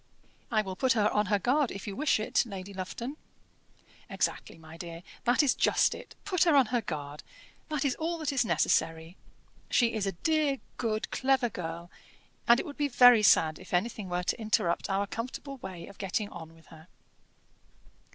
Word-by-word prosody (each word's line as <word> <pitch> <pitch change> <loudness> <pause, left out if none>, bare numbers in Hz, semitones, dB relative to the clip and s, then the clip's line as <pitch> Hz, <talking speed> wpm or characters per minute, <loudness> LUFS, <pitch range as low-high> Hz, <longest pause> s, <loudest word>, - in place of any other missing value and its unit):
"I 215 -2 +2
will 190 -2 -6
put 260 +6 +2
her 215 -2 +2
on 210 -1 +1
her 205 +1 +2
guard 255 +6 +1
if 195 - -7
you 200 - -5
wish 300 -1 +2
it, 215 - +1
Lady 200 -3 -8
Lufton." 230 +9 -6 0.9
"Exactly, - - -2
my 160 0 -13
dear; 170 0 -8 0.2
that 245 +5 +4
is 275 - +3
just - - +2
it. - - -11
Put 365 -3 +2
her 330 -4 +4
on 270 -2 +6
her 240 - +2
guard 150 -6 -6 0.5
that 300 -2 -1
is 270 - +2
all 335 +2 -1
that 310 -3 -2
is 265 - +2
necessary. 165 -2 0 0.5
She 235 -2 +3
is 210 -3 -1
a 195 - -1
dear, 310 -3 +2 0.2
good, 220 -2 -2
clever 260 -2 +2
girl, 170 -2 -6 0.6
and 235 +1 +6
it - - -3
would 290 -3 -8
be 290 - +1
very 245 -3 +7
sad 160 -6 +4
if 185 -1 -4
anything 205 0 -2
were 180 0 -1
to 200 - -2
interrupt 190 -5 0
our 195 +1 +1
comfortable 255 +6 -6
way 185 -7 -8
of 200 - -14
getting 205 +2 -2
on 165 0 -10
with 165 -1 -20
her." 160 +1 -15
215 Hz, 190 wpm, -29 LUFS, 180-260 Hz, 0.9 s, very